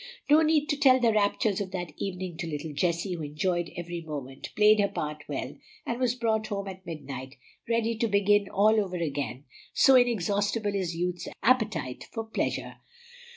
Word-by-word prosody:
No 305 +2 +7
need 310 -1 +3
to 290 - +1
tell 265 -3 +6
the 235 -3 +3
raptures 205 -1 +1
of 195 - -3
that 175 -4 -4
evening 185 -2 -4
to 165 - -3
little 150 0 -5
Jessie, 170 +4 0
who 170 - -5
enjoyed 165 +4 -1
every 175 0 -5
moment, 140 -4 -7
played 210 0 +6
her 200 - +4
part 150 -4 -4
well, 135 -2 -4 0.3
and 235 +1 -3
was 250 -2 +1
brought 220 -3 0
home 200 -1 -3
at 190 -1 -8
midnight 135 -4 -7 0.3
ready 230 0 +1
to 230 - +2
begin 205 0 +3
all 215 +2 +4
over 185 -2 -5
again, 140 -6 -3 0.3
so 270 - +6
inexhaustible 210 -3 +2
is 185 -4 -2
youth's 175 0 -2 0.2
appetite 220 - +1
for 225 - -3
pleasure. 225 - -3
195 Hz, 175 wpm, -28 LUFS, 165-220 Hz, 0.3 s, No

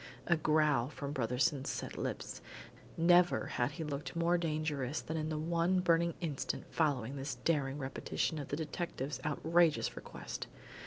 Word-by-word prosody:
A 170 - +4
growl 150 -5 +3
from 145 -1 -5
Brotherson's 130 +2 +1
set - - -4
lips. - - -4 0.6
Never 175 +1 +5
had 120 +4 -1
he 165 +1 -4
looked 145 0 -4
more 170 +1 +3
dangerous 155 -4 -1
than 160 - -5
in 155 -1 -1
the 155 - -1
one 170 +3 +2
burning 170 -1 +3
instant 150 -6 -2
following 140 -5 0
this 135 -1 -3
daring 145 -4 +1
repetition 145 +3 -2
of 145 - -5
the - - -2
detective's 150 -4 -3
outrageous 160 +2 +2
request. - - -6
155 Hz, 150 wpm, -34 LUFS, 140-165 Hz, 0.6 s, Never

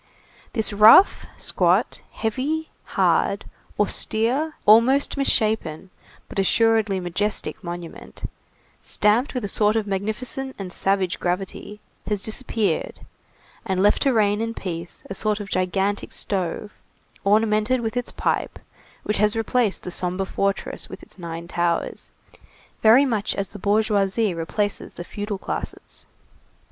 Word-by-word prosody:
This 220 -3 0
rough, 215 - +7
squat, - - +1
heavy, 280 +8 -2 0.3
hard, - - +2 0.3
austere, 260 +8 +1
almost 235 +7 +5
misshapen, 215 - 0 0.4
but - - -5
assuredly 220 0 +2
majestic 205 +4 -2
monument, 175 -1 -8 0.6
stamped 225 +7 +1
with 245 -4 -2
a - - -2
sort 210 +2 +2
of 220 -2 +1
magnificent 220 +7 -3
and 190 -2 -6
savage 195 -2 0
gravity, 195 +3 -4 0.3
has 205 -2 -1
disappeared, 220 - -1 0.6
and 190 -3 0
left 205 - +4
to 275 - +3
reign 210 -2 +2
in 230 0 -3
peace, 170 -2 -6
a - - -5
sort 210 +1 -1
of 200 -2 -7
gigantic 190 +2 -1
stove, 195 +1 -2 0.5
ornamented 215 +4 +2
with 225 +1 -3
its 245 -1 -2
pipe, - - -1 0.5
which 210 - -1
has 210 +1 +2
replaced 225 -1 0
the 180 - -5
sombre 180 +2 -1
fortress 200 +1 -2
with - - -10
its - - -11
nine 170 -1 -6
towers, 170 -1 -2 0.7
very 235 +6 +7
much 220 -6 -1
as 195 -1 -2
the 205 - -10
bourgeoisie 205 0 +1
replaces 195 +5 -2
the 175 - -6
feudal 205 +2 -5
classes. - - -6
210 Hz, 130 wpm, -23 LUFS, 190-225 Hz, 0.7 s, rough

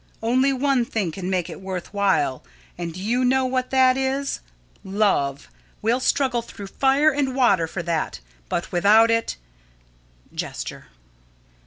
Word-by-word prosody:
Only 255 +4 +3
one 270 -1 +1
thing 210 -7 -2
can 185 +2 -5
make 185 -2 0
it - - -9
worth 190 0 -6
while, 195 -10 +1 0.3
and 170 -1 -5
do 170 - -9
you 235 +6 0
know 260 +1 +3
what 255 0 -1
that 260 -1 +4
is? 270 +1 -1 0.4
Love. 190 -9 0 0.4
We'll 235 +3 +2
struggle 255 -2 +1
through 215 -3 -10
fire 275 +3 +3
and 270 -2 -1
water 200 -11 +3
for 170 +2 -5
that; 165 -1 -2 0.3
but 170 - -2
without 210 +5 +5
it 230 0 0 1.0
[_Gesture. - - -5
230 Hz, 145 wpm, -23 LUFS, 185-260 Hz, 1.0 s, without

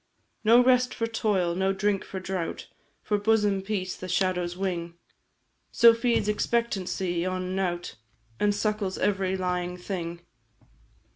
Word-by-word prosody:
"No 235 +3 +6
rest 250 0 +3
for 230 - -1
toil, 205 -6 0
no 190 +2 +1
drink 195 0 0
for 190 - -6
drought, 185 -2 -4 0.4
For 210 -1 0
bosom 205 -2 +2
peace 190 -2 -3
the 185 - -8
shadow's 180 -1 0
wing 175 -3 -3 0.8
So 235 -1 +7
feeds 230 -2 +1
expectancy 195 -5 -1
on 185 0 -2
nought, 175 -6 -2 0.4
And 205 -1 +2
suckles 210 -2 -1
every 190 -2 0
lying 180 -1 -2
thing. 175 -2 -5
190 Hz, 130 wpm, -27 LUFS, 180-210 Hz, 0.8 s, So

